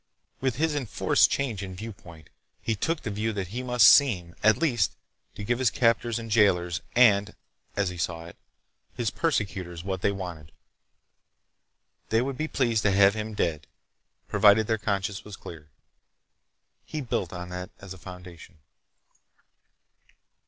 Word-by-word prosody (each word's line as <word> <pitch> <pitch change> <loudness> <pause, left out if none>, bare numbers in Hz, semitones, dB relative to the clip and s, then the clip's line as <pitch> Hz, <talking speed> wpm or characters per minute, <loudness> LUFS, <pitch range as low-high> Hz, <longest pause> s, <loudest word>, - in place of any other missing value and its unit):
With 130 -3 -1
his 155 +3 0
enforced 135 -7 +2
change 120 -8 -2
in 95 -2 -7
viewpoint, 90 -6 -11 0.3
he 115 - -1
took 160 - -1
the 105 - -3
view 105 +2 -1
that 95 -4 -4
he 120 +6 -4
must 125 -2 +5
seem, 95 - +5
at 110 0 +5
least, 120 - +1 0.4
to 105 - -7
give 120 +4 0
his 130 -3 +3
captors 115 -1 +1
and 115 -1 -7
jailers 90 -5 +3
and—as 100 -3 +1
he 90 -1 -8
saw 85 -1 -3
it—his 110 +6 -8
persecutors 95 - -2
what 95 -1 -3
they 100 - +2
wanted. 85 -6 -7 1.6
They 110 - +3
would 135 0 -3
be 155 +4 -2
pleased 120 -7 +1
to 100 - +2
have 100 +1 +5
him 110 0 -5
dead, 80 -6 -1 0.6
provided 105 +1 +5
their 110 0 0
consciences 100 -1 -2
were 105 - -11
clear. 80 -5 -10 1.1
He 155 - -6
built 115 - -2
on 90 0 -7
that 90 +1 -6
as 100 -1 -9
a 95 - -13
foundation. 90 -3 -12
100 Hz, 145 wpm, -27 LUFS, 90-115 Hz, 1.6 s, must